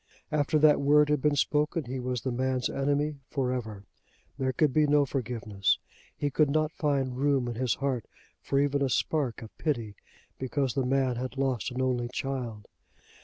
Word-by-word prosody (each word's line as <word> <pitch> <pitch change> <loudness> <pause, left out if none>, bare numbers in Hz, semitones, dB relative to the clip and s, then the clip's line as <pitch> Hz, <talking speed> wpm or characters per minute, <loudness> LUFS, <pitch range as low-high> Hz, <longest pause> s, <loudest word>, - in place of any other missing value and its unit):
After 150 +1 +2
that 150 -1 +5
word 150 +1 +5
had 150 -2 +2
been 150 0 +2
spoken 150 +3 +1
he 130 +2 -4
was 125 -1 -2
the 130 - -2
man's 130 +1 0
enemy 145 +1 0
for 130 -3 -1
ever. 110 -5 -5 0.6
There 130 -1 +1
could 140 +1 +2
be 155 -1 +4
no 145 0 +4
forgiveness. 115 -7 -1 0.4
He 145 - -1
could 150 +2 +3
not 155 +2 +1
find 140 -5 0
room 140 -3 +2
in 120 - -2
his 120 -2 0
heart 135 -4 -2 0.4
for 140 - 0
even 140 0 +1
a 135 - +2
spark 130 -3 0
of 110 - -12
pity 120 -9 -1 0.5
because 130 0 -1
the 135 -2 0
man 130 -2 +1
had 130 +2 -5
lost 130 -5 0
an 130 +1 -2
only 125 -2 0
child. 125 -5 -4
135 Hz, 180 wpm, -28 LUFS, 125-145 Hz, 0.6 s, that